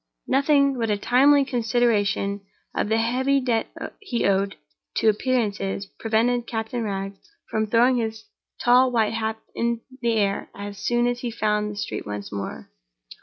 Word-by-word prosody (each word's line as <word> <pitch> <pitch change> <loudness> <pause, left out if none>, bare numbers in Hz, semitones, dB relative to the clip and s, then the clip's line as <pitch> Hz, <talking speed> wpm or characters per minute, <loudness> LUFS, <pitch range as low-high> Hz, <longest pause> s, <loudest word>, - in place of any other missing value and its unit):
Nothing 280 -1 +3
but 225 -1 0
a 205 - +2
timely 275 +6 +4
consideration 225 -5 +1 0.3
of - - -1
the 220 - +3
heavy 255 +5 +2
debt 240 -4 0 0.3
he 320 - -2
owed 195 0 +1 0.4
to 220 - +4
appearances 205 -4 0
prevented 235 +2 +1
Captain 225 +1 -3
Wragge 195 -2 -3 0.3
from 220 0 0
throwing 240 +4 +4
his 220 -1 -3 0.4
tall 250 +2 +6
white 225 -2 +2
hat 220 0 -1
up 220 - -32
in 235 0 -1 0.2
the 235 -1 +2
air 200 -3 0
as 200 0 -7
soon 240 +3 +1
as 245 0 0
he 245 - -3
found 210 -2 0
the 205 - -6
street 205 - -4
once 105 -1 -5
more. 100 -10 -6
225 Hz, 160 wpm, -24 LUFS, 205-245 Hz, 0.4 s, tall